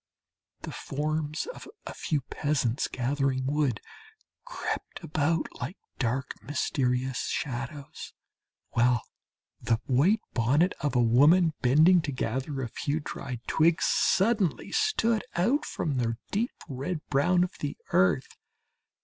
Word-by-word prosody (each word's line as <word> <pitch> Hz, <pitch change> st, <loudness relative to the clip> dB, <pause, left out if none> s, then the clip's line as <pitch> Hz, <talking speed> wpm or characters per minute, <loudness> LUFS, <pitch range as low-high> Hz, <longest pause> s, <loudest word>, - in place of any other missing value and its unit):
The -, -, -5 dB
forms 155 Hz, +2 st, -2 dB
of -, -, -11 dB, 0.2 s
a -, -, -6 dB
few 150 Hz, -3 st, -1 dB
peasants 135 Hz, -2 st, -1 dB
gathering 130 Hz, +1 st, -1 dB
wood 140 Hz, -5 st, +1 dB, 0.7 s
crept -, -, -5 dB
about 155 Hz, +2 st, 0 dB, 0.2 s
like 185 Hz, -, -4 dB, 0.2 s
dark 130 Hz, +2 st, -2 dB
mysterious 130 Hz, -2 st, -1 dB
shadows, 135 Hz, +2 st, -5 dB, 0.6 s
while 120 Hz, 0 st, +3 dB, 0.6 s
the 115 Hz, -, +1 dB
white 165 Hz, -, +3 dB
bonnet 145 Hz, -, +3 dB
of 145 Hz, -2 st, -1 dB
a 120 Hz, -, +4 dB
woman 155 Hz, +9 st, +5 dB
bending 155 Hz, +8 st, +6 dB
to 155 Hz, -, -3 dB
gather 135 Hz, +2 st, -2 dB
a -, -, -2 dB
few 145 Hz, +6 st, -2 dB
dried 125 Hz, -5 st, -6 dB
twigs 160 Hz, 0 st, +3 dB
suddenly 195 Hz, -4 st, +2 dB
stood 330 Hz, -, +2 dB
out 245 Hz, -, +2 dB
from 145 Hz, -4 st, -2 dB
the 115 Hz, -2 st, 0 dB
deep 225 Hz, +5 st, +1 dB, 0.2 s
red 150 Hz, +4 st, -4 dB
brown 175 Hz, +6 st, +3 dB
of 180 Hz, -, -5 dB
the 145 Hz, -, -4 dB
earth. 90 Hz, -8 st, +2 dB
145 Hz, 125 wpm, -28 LUFS, 125-165 Hz, 0.7 s, bending